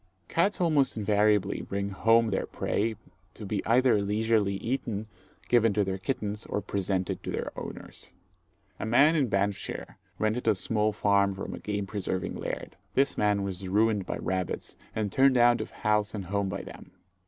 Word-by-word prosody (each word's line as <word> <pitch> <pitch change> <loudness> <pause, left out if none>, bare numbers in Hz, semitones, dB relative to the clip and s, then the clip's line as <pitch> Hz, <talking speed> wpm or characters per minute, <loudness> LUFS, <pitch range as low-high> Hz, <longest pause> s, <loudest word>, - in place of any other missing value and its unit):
Cats 195 +5 +1
almost 155 -9 +2
invariably 105 -1 +2
bring 100 0 -3
home 115 +3 +3
their 95 - -1
prey 110 +2 -1 0.4
to 110 - -8
be 100 0 -2
either 120 -2 +4
leisurely 105 0 +1
eaten, 110 -1 -3 0.4
given 115 -3 +4
to 105 0 +2
their 95 0 -3
kittens, 105 -1 -3
or - - -1
presented 95 -2 -2
to - - -6
their - - -3
owners. - - -8 0.7
A - - -3
man 140 +8 +5
in 145 -5 +2
Banffshire 100 0 -2 0.2
rented 110 +3 -1
a 110 - +5
small 105 +2 +1
farm 100 -1 +2
from 95 - -5
a - - -6
game 105 -1 -3
preserving 95 -2 -3
laird. - - -5 0.2
This 135 +1 +3
man 105 -1 +2
was 95 -1 -4
ruined 105 -1 +2
by - - -2
rabbits, 95 -1 -3 0.2
and 105 -2 -1
turned 135 +2 +4
out 120 0 +5
of - - -5
house 105 0 0
and 100 -3 -4
home 100 +1 -1
by - - -4
them. - - -11
105 Hz, 170 wpm, -28 LUFS, 100-115 Hz, 0.7 s, man